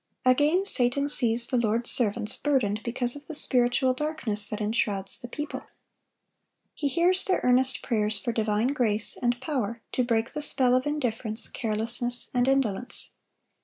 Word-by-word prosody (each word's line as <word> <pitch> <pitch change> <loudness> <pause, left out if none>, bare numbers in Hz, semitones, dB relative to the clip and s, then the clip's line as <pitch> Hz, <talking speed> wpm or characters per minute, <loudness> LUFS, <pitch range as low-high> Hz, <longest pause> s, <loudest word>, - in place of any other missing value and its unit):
Again, 295 +9 +2
Satan 270 -3 +4
sees 235 -4 0
the 250 -1 -2
Lord's 230 +1 +4
servants 220 -2 +4
burdened 225 -8 -2
because 245 +1 0
of 290 0 -12
the 315 - -5
spiritual 255 -1 +1
darkness 255 -8 -1
that 210 - -6
enshrouds 210 -2 0
the 245 - -8
people. 295 +4 -7 1.1
He 290 - -4
hears 355 +6 +1
their 375 - -1
earnest 255 +1 +1
prayers 215 -3 -2
for 220 +4 -4
divine 220 +1 -1
grace 225 -6 +3
and 240 0 -2
power 240 -5 -5
to 250 - -1
break 230 -1 -2
the 300 - -4
spell 260 -4 +3
of 255 +2 0
indifference, 235 -6 -1
carelessness, 235 +1 -3
and 245 0 0
indolence. 250 -4 -2
245 Hz, 155 wpm, -25 LUFS, 225-270 Hz, 1.1 s, Satan